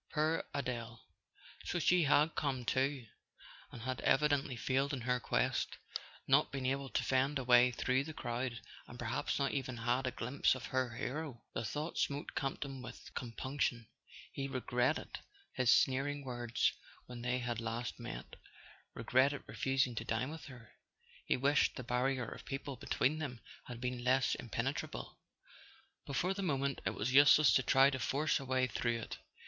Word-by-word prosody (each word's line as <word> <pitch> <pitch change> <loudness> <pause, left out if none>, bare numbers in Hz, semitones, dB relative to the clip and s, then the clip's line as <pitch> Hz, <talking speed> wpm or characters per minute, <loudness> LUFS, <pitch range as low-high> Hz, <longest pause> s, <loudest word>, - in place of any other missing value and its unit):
Poor 155 +1 +1
Adele! 120 -4 -3 0.6
So - - -2
she 175 +1 +4
had 150 +3 +4
come 130 -4 -1
too—and 130 -2 -4
had 130 0 -2
evi¬ 150 +3 +3
dently 140 -3 0
failed 135 +4 0
in 130 - -3
her 125 +1 +1
quest, - - 0 0.5
not - - +4
been 135 -1 -3
able 135 +1 -1
to - - 0
fend 135 +2 +2
a 135 - -2
way 125 0 +6
through 130 +2 +1
the 160 - -6
crowd, 120 -3 -3 0.3
and 120 - -10
perhaps 120 0 -1
not 140 -1 +1
even 130 -3 -3
had 120 +3 0
a - - 0
glimpse 125 +3 +1
of 130 - -7
her 130 -3 -1
hero. 135 -1 -4
The - - -2
thought 150 +9 -3
smote 145 +1 -1
Campton 135 -1 -3
with - - -10
com¬ 115 -3 -6
punction: 130 -4 -1 0.5
he 135 -1 -3
regretted 130 +1 -1 0.3
his 125 -2 +3
sneering 140 +2 +2
words 120 -2 0 0.3
when 125 -1 -8
they 125 +1 0
had 120 -2 -2
last 115 +1 -4
met, - - -7 0.6
regretted 140 +3 +2
refusing 135 -2 0
to 115 - -3
dine 120 +5 -1
with 160 -1 -8
her. 120 -5 -12 0.6
He - - +2
wished 140 +3 +3
the 130 - -5
barrier 125 +1 0
of - - -8
people 135 0 -5
between 140 +3 0
them 130 -6 -4 0.3
had 120 -2 -7
been 125 0 -3
less 130 +1 +3
impenetrable; 120 +4 -4 0.9
but 140 - -4
for 180 +7 +1
the 195 - -4
moment 140 -6 0
it - - -1
was 120 +5 -1
useless 145 +2 +7
to - - +5
try 135 +2 +5
to 130 - -3
force 145 +7 +1
a 135 - -7
way 130 0 +2
through 120 0 -1
it. 115 - -7
130 Hz, 170 wpm, -35 LUFS, 120-140 Hz, 0.9 s, useless